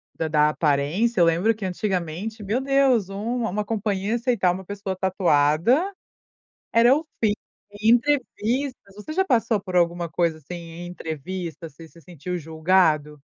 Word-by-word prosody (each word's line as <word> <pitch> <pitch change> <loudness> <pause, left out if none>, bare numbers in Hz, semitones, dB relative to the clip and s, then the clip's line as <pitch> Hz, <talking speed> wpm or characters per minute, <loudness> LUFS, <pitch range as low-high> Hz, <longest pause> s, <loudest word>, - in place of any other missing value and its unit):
da 160 - -2
da 150 -1 +3
aparência, 160 +9 +1
eu - - +7
lembro 180 +7 +2
que 215 - -9
antigamente, 190 +3 -3
meu 215 +6 0
Deus, 265 -7 +2
um 230 +5 -3
uma 210 +1 -1
companhia 205 0 -1
aceitar 230 -7 +1
uma 185 +1 -6
pessoa 200 -1 -4
tatuada 185 - +2 0.8
era 235 +3 +6
o 320 - -3 0.2
fim, 210 -2 +4 0.5
e 215 - +1
em - - +8
entrevistas 255 -3 -1
você 210 +9 -8
já 380 +3 +2
passou 230 - +1
por 185 -2 -8
alguma 170 0 +1
coisa 165 0 0
assim 155 +4 -9
em 170 0 -8
entrevista? 165 0 -6
Você 160 +2 -14
se 170 - -18
sentiu 175 +3 -6
julgado? 160 -2 +1
190 Hz, 160 wpm, -24 LUFS, 165-225 Hz, 0.8 s, em